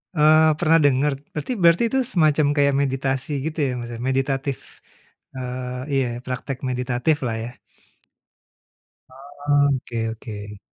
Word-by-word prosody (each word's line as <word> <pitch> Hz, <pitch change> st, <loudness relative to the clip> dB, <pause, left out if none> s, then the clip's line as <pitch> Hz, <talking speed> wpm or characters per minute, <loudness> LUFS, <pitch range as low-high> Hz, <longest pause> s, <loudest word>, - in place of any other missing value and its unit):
Eee, 155 Hz, 0 st, +5 dB
pernah 165 Hz, -1 st, +4 dB
dengar, 145 Hz, 0 st, +3 dB, 0.2 s
berarti 150 Hz, -, -3 dB
berarti 170 Hz, +3 st, +5 dB
itu 265 Hz, -, +2 dB
semacam 155 Hz, -3 st, +3 dB
kayak 140 Hz, -1 st, +3 dB
meditasi 135 Hz, 0 st, -1 dB
gitu 160 Hz, 0 st, -4 dB
ya? -, -, 0 dB
Maksudnya 120 Hz, -1 st, -6 dB
meditatif, 135 Hz, 0 st, -1 dB, 0.8 s
eee, 125 Hz, 0 st, -5 dB
iya, 135 Hz, -2 st, +2 dB, 0.2 s
praktek 130 Hz, +1 st, -4 dB
meditatiflah 125 Hz, 0 st, -1 dB
ya? -, -, -6 dB, 1.6 s
Oh 145 Hz, +2 st, 0 dB
oke 120 Hz, -2 st, -5 dB
oke. 105 Hz, -2 st, -8 dB
135 Hz, 115 wpm, -22 LUFS, 125-150 Hz, 1.6 s, Eee